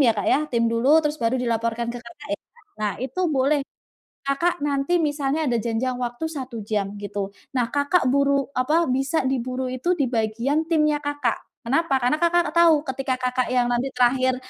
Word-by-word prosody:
ya 240 -5 +5
Kak 205 - -2
ya, - - +4
tim 235 -1 +1
dulu, 230 +3 +1
terus 300 0 -1
baru 230 +2 +1
dilaporkan 230 0 -1
ke 245 - -6
Kakak 250 +5 -13
ya? 305 - -2 0.4
Nah, 210 -2 0
itu 265 +8 -3
boleh. 280 +1 +2 0.7
Kakak 340 +5 +1
nanti 290 +4 +1
misalnya 290 +1 0
ada 235 - +1
janjang 235 +3 -1
waktu 245 +5 -3
1 260 -5 -6
jam, 205 -1 -2
gitu. 200 -1 -4 0.2
Nah, 245 -2 +2
Kakak 285 +3 +2
buru 280 0 +2
apa, 310 +7 +2
bisa 270 +4 0
diburu 255 0 -2
itu 300 +8 0
di 275 - +3
bagian 235 +7 0
timnya 305 -2 +2
Kakak. 290 -5 -1 0.2
Kenapa? 275 +4 +1
Karena 250 +5 +1
Kakak 345 -2 +2
tahu 330 -3 +5
ketika 265 -2 -2
Kakak 255 0 -1
yang 245 -1 +1
nanti 245 +2 0
terakhir, 255 +1 +3
260 Hz, 180 wpm, -23 LUFS, 240-295 Hz, 0.7 s, ya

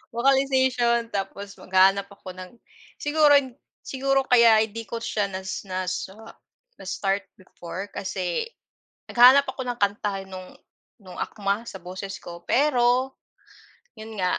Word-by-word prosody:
vocalization, 260 -2 +2
tapos 200 0 -5
maghahanap 195 +1 +3
ako 200 -2 -11
ng 185 0 -10 0.4
siguro 295 0 +4 0.5
siguro 270 0 0
kaya 235 -4 +5
hindi 225 +1 -7
ko 230 -1 -5
siya 210 -3 -1
na 190 -1 -6
nas 185 -1 -4
ah, 220 +4 -13 0.5
na-start 195 0 -2
before, 185 +1 -9
kasi, 185 - -3 0.6
naghahanap 255 +3 +7
ako 260 - -5
ng 245 -1 -3
kanta, 200 -1 -1
no'ng 185 -1 -9 0.5
no'ng 185 -1 -11
akma 205 +2 -2
sa 190 - -8
boses 190 +2 -7
ko, 170 0 -9
pero, 255 -1 +2 0.9
'yon 220 0 -9
nga, 180 -1 0
210 Hz, 125 wpm, -24 LUFS, 190-245 Hz, 0.9 s, naghahanap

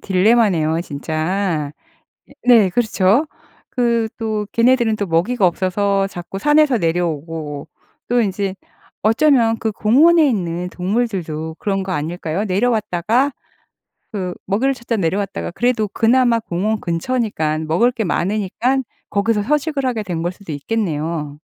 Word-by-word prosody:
딜레마네요 185 -5 +2
진짜. 155 +1 -2 0.6
예 - - -18
네 225 -6 +6
그렇죠. 220 - +2 0.4
그 235 -3 +1
또 215 -2 -2
걔네들은 235 -2 +3
또 205 - -2
먹이가 185 +6 +1
없어서 195 +2 +1
자꾸 175 0 -7
산에서 295 -2 +4
내려오고 165 -4 -2 0.4
또 245 0 +2
인제 195 -1 -2 0.5
어쩌면 225 0 +3
그 220 -1 -1
공원에 300 +10 +4
있는 180 -4 -2
동물들도 180 -6 -2
그런 195 -2 -1
거 190 - -5
아닐까요? 170 +4 -2
내려왔다가 220 +4 +1 0.8
그 185 -4 -3
먹이를 250 +8 +1
찾다 235 -2 -3
내려왔다가 195 +2 -2
그래도 240 -2 0
그나마 235 +3 +3
공원 210 +3 -2
근처니깐 165 -4 -1
먹을 205 +11 +3
게 225 -2 -2
많으니깐 215 +9 0 0.3
거기서 210 +1 +1
서식을 295 +2 0
하게 230 -4 -1
된 175 -4 -4
걸 175 +1 -1
수도 185 -4 -9
있겠네요. 155 -4 -3
200 Hz, 300 characters per minute, -19 LUFS, 175-235 Hz, 0.8 s, 네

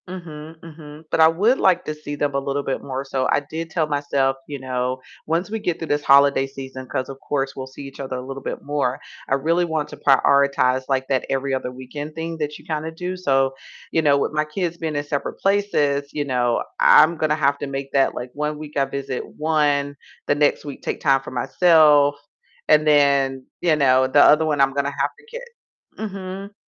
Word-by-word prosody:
Mhm, 160 -3 -9
mhm, 155 -1 -12
but - - 0
I 160 - +8
would 205 +11 +2
like 180 -2 +3
to 155 - -3
see 150 -1 -7
them 145 -1 -1
a 140 - +1
little 140 +1 -2
bit 135 - -3
more, 135 0 -5
so 135 -1 -1
I - - +3
did 160 +3 -7
tell 160 -1 0
myself, 145 -2 0
you 145 - -5
know, 130 0 -2 0.3
once 170 +5 -1
we 225 - -2
get 175 -5 -2
through 165 - -7
this 145 0 0
holiday 140 -1 +5
season, 130 -1 -9
'cause 130 0 -3
of 135 0 -9
course 135 -1 -2
we'll 130 0 -6
see 130 +2 -11
each 135 -1 -11
other 135 -1 -4
a - - -5
little 135 +1 -7
bit - - -6
more, 145 -2 -1 0.3
I 135 - +3
really 165 +6 +1
want 160 -3 -2
to - - -10
prioritize, 135 -1 +3
like, 130 -1 0
that 130 -2 0
every 135 0 -1
other 130 -1 -2
weekend 145 +4 -8
thing 165 0 -5
that 150 0 -3
you - - -18
kinda 160 0 -3
do, 180 +3 -5
so, 135 -6 +1 0.4
you 160 - +2
know, 145 -2 +4
with 140 - -1
my 155 0 0
kids 170 +2 -3
being 160 -3 -4
in 145 - -1
separate 145 -1 -4
places, 145 -9 +1
you 145 -1 -2
know, 125 -3 0 0.2
I'm 155 +3 +6
gonna 155 -1 +1
have 140 -2 +1
to 145 - -4
make 135 0 -5
that, 135 -1 +2
like, 125 0 -6
one 150 +1 -3
week 150 -1 -8
I 140 - +3
visit 135 -1 -4
one, 145 -2 +1 0.3
the - - +2
next 145 0 +1
week 145 - -8
take - - -4
time 135 -1 +3
for - - -9
myself, 145 +2 +4 0.5
and 155 0 +5
then, 140 -3 +3 0.2
you 165 -3 +3
know, 130 -2 +4
the 145 +2 +4
other 155 +2 +6
one 150 -2 0
I'm 135 0 +3
gonna 140 0 0
have 140 +1 +1
to - - -20
ki 475 +2 -8 0.6
Mhm. 195 -1 -6
145 Hz, 220 wpm, -22 LUFS, 135-155 Hz, 0.6 s, I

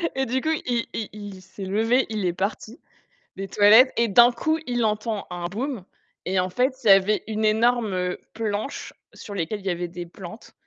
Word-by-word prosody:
et 265 0 0
du 260 +2 -1
coup, 315 - -1 0.2
il 240 -2 0
il 220 - -4
il 205 -3 -9
s'est 190 +1 -9
levé, 225 +6 +2
il 215 -3 -2
est 175 - 0
parti 210 +6 -4 0.6
des 195 0 -5
toilettes 215 +7 +6
et 235 - +3
d'un 240 +4 +6
coup, 315 +7 -1
il 240 -2 0
entend 215 0 -2
un 175 -1 -5
boum. 230 +3 -4 0.4
Et 190 +1 0
en 185 0 0
fait, 255 +8 +1
il - - -1
y - - +6
avait 195 0 +5
une 220 0 -1
énorme 215 -5 +1 0.2
planche 215 +3 -4 0.2
sur 205 - -10
lesquelles 195 +2 -3
il 195 - -16
y - - +2
avait 175 0 -3
des 175 0 -7
plantes 175 +5 -11
215 Hz, 200 wpm, -24 LUFS, 190-235 Hz, 0.6 s, toilettes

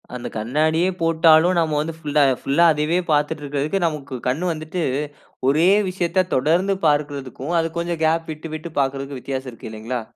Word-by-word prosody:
அந்த 125 - -5
கண்ணாடியே 155 +10 +1
போட்டாலும், 165 +1 +4
நம்ம 155 -2 0
வந்து 165 +2 -4
ஃபுல்லா 150 -2 +2 0.2
ஃபுல்லா 145 +5 +3
அதயவே 155 +4 0
பாத்துட்ருக்கிறதுக்கு, 150 +3 0
நமக்கு 140 -4 -5
கண்ணு 165 +8 0
வந்துட்டு 155 +2 -4 0.7
ஒரே 160 +6 +4 0.2
விஷயத்த 185 0 0
தொடர்ந்து 170 +9 +2
பார்க்குறதுக்கும், 145 0 -2
அது 165 - -2
கொஞ்சம் 170 -1 -3
கேப் 165 +1 0
விட்டு 155 +2 -9
விட்டு 160 +2 -7
பாக்குறதுக்கும் 135 0 -3
வித்தியாசம் 130 -1 -4
இருக்கு 115 - -9
இல்லைங்களா! 115 +3 -4
155 Hz, 150 wpm, -21 LUFS, 140-165 Hz, 0.7 s, போட்டாலும்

